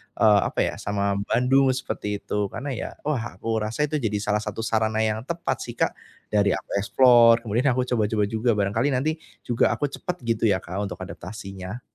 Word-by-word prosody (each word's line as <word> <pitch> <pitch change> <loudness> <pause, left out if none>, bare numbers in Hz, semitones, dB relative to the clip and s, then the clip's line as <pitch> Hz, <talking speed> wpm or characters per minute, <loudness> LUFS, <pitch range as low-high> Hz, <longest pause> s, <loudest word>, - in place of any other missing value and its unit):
eee, 105 -1 +5
apa - - -4
ya, - - -1
sama 100 0 -1
Bandung 135 +3 +3
seperti 105 -6 -4
itu. 105 -1 -1
Karena 120 +8 -5
ya, 125 - -4
wah, 120 -9 -2
aku 110 +3 -2
rasa 110 +7 -1
itu 155 - -1
jadi 110 -5 -1
salah 105 0 +1
satu 105 0 -5
sarana 110 -1 +1
yang 110 0 0
tepat 165 -7 -2
sih, 120 - -8
Kak, - - +1 0.4
dari 100 -2 +3
aku - - -9
explore, 120 +2 +6
kemudian 120 +4 0
aku 130 +1 +1
coba-coba 110 -3 +1
juga, 110 +3 0
barangkali 105 +6 +1
nanti 155 +5 -1 0.2
juga 120 -1 +2
aku 145 - -1
cepet 180 +5 -4
gitu 115 -1 -1
ya, 95 -3 +2
Kak, 100 +4 -3
untuk 95 - -8
adaptasinya. 95 +3 -8
110 Hz, 190 wpm, -24 LUFS, 105-125 Hz, 0.4 s, explore